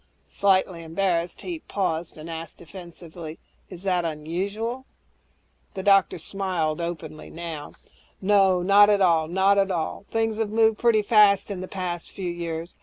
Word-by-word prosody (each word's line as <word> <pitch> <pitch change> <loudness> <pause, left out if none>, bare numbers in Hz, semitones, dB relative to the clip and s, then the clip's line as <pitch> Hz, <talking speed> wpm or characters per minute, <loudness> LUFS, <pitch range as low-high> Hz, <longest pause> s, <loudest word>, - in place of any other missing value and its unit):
Slightly 190 -3 +1
embarrassed, 170 +1 -1
he 345 -3 -5
paused 175 - -3
and 155 +1 -9
asked 165 0 -7
defensively, 170 -2 -10 0.3
"Is 180 -1 -10
that 180 -3 +1
unusual?" 195 +11 -3 0.9
The 190 - -4
doctor 195 -2 +4
smiled 175 -3 -2
openly 160 -2 -6
now, 165 -3 -7 0.5
"Not 195 0 +5
at 205 -1 +3
all, 165 -4 +3
not 190 +3 +3
at 195 0 +2
all. 175 +2 -3
Things 225 -1 -1
have 220 -2 0
moved 220 0 +3
pretty 230 -3 +3
fast 205 -2 +4
in 185 -2 -4
the 185 - -6
past 180 -3 -5
few 180 -3 -4
years. 170 0 -5
185 Hz, 145 wpm, -25 LUFS, 165-200 Hz, 0.9 s, Not